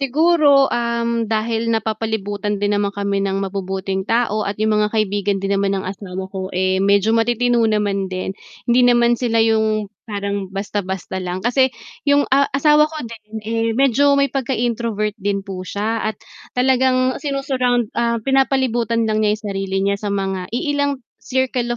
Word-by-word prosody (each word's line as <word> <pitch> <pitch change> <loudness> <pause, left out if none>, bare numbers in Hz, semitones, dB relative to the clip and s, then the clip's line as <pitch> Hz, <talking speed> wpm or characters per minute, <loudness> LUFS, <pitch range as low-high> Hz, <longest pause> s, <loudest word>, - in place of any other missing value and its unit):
siguro, 285 0 +4
um, 235 -1 0
dahil 225 +1 -1
napapalibutan 215 -2 -2
din 205 - +2
naman 205 - +1
kami 200 -1 -1
ng 195 0 -1
mabubuting 190 0 -3
tao 215 -3 +1
at 200 - -2
'yung 215 0 +2
mga 210 - +2
kaibigan 205 -2 0
din 195 - 0
naman 195 0 +1
ng 190 - -4
asawa 190 0 -6
ko, 190 -1 -4
eh, 185 0 +1
medyo 200 +2 +3
matitino 240 +1 +2
naman 205 -2 0
din. 185 +1 -4 0.4
Hindi 240 +1 +4
naman 240 -1 +4
sila 230 -2 +1
yung 220 -2 +1
parang 200 -3 -4
basta-basta 190 -1 -4
lang 180 0 -3
kasi 260 +1 +3 0.3
yung, 285 0 +3
ah, 280 0 +3
asawa 300 +2 +4
ko 315 - -8
din 220 -1 -12
eh, 225 0 0
medyo 275 +3 +3
may 280 - +4
pagka-introvert 235 -5 -1
din 200 -1 -3
po 185 -1 -5
siya 215 +3 -2
at 205 - -11 0.4
talagang 255 0 +3
sinu-surround, 265 -4 0
ah, 235 0 +1
pinapalibutan 240 -3 +1
lang 215 0 +1
niya 210 0 +1
yung 220 - -23
sarili 195 -1 -3
niya 200 +1 +1
sa 205 - -2
mga 195 -2 -2
iilang 285 +1 -1 0.2
circle 255 -2 -1
220 Hz, 160 wpm, -19 LUFS, 200-245 Hz, 0.4 s, siguro